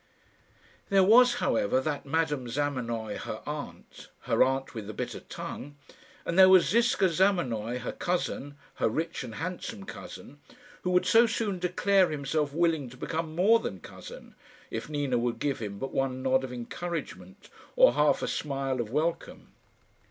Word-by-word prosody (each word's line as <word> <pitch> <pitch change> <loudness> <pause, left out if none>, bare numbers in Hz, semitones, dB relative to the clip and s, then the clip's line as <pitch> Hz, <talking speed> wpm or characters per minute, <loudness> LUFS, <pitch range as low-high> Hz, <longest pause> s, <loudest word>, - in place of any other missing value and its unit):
There 195 -2 +5
was, 240 +5 +6
however, 115 - +1
that 145 +1 -3
Madame 150 -4 0
Zamenoy, 120 -5 -2
her - - -6
aunt - - -8
her - - 0
aunt 135 +1 -1
with 110 -4 -6
the 110 - -7
bitter - - -4
tongue; 145 +2 -8 0.5
and 170 +3 0
there 190 0 +9
was 185 -2 +6
Ziska 235 -2 +3
Zamenoy, 155 - +1
her 125 - -4
cousin 145 -5 -3 0.2
her - - +2
rich 155 +4 -3
and 115 -3 -8
handsome 185 +4 -5
cousin, 145 -6 -10 0.4
who 180 - -2
would 180 0 +3
so 230 +1 +6
soon 215 -4 -2
declare 185 +1 +2
himself 145 0 -1
willing 160 -4 +1
to 125 - -14
become 160 +3 -4
more 210 +7 +5
than 95 - -5
cousin, - - -11 0.4
if 115 +6 -5
Nina 145 -5 0
would 120 0 0
but - - -19
give 140 -2 -1
him 100 -3 -6
one 135 -1 -2
nod 130 0 +2
of 130 - -5
encouragement, 125 - -6 0.2
or - - +6
half - - +2
a - - -1
smile 135 -3 -2
of 110 - -5
welcome. 155 +6 -3
145 Hz, 160 wpm, -28 LUFS, 125-180 Hz, 0.5 s, there